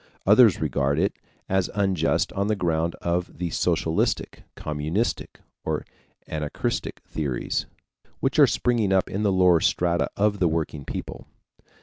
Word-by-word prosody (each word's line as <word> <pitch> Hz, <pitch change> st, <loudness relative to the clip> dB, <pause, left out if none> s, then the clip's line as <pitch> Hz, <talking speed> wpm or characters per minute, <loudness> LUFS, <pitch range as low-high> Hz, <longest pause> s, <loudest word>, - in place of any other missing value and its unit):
Others 105 Hz, 0 st, +6 dB
regard 70 Hz, -1 st, 0 dB
it 95 Hz, +5 st, +1 dB, 0.3 s
as 95 Hz, -1 st, +1 dB
unjust 95 Hz, -5 st, +1 dB
on 100 Hz, +1 st, -1 dB
the 110 Hz, -, +1 dB
ground 85 Hz, -3 st, 0 dB
of 90 Hz, +1 st, -2 dB
the 90 Hz, -2 st, -3 dB
socialistic, 80 Hz, -1 st, 0 dB
communistic, 75 Hz, +9 st, -3 dB, 0.2 s
or -, -, -2 dB, 0.4 s
anarchistic 75 Hz, -2 st, -3 dB
theories, 70 Hz, -6 st, -2 dB, 0.5 s
which -, -, 0 dB
are -, -, +8 dB
springing 115 Hz, -5 st, +1 dB
up 95 Hz, -1 st, +2 dB
in 100 Hz, -, -2 dB
the 105 Hz, -2 st, +2 dB
lower 90 Hz, -2 st, +5 dB
strata 85 Hz, +1 st, +1 dB
of 105 Hz, 0 st, +2 dB
the 90 Hz, -, +3 dB
working 80 Hz, -3 st, -2 dB
people. -, -, -6 dB
90 Hz, 135 wpm, -25 LUFS, 80-100 Hz, 0.5 s, are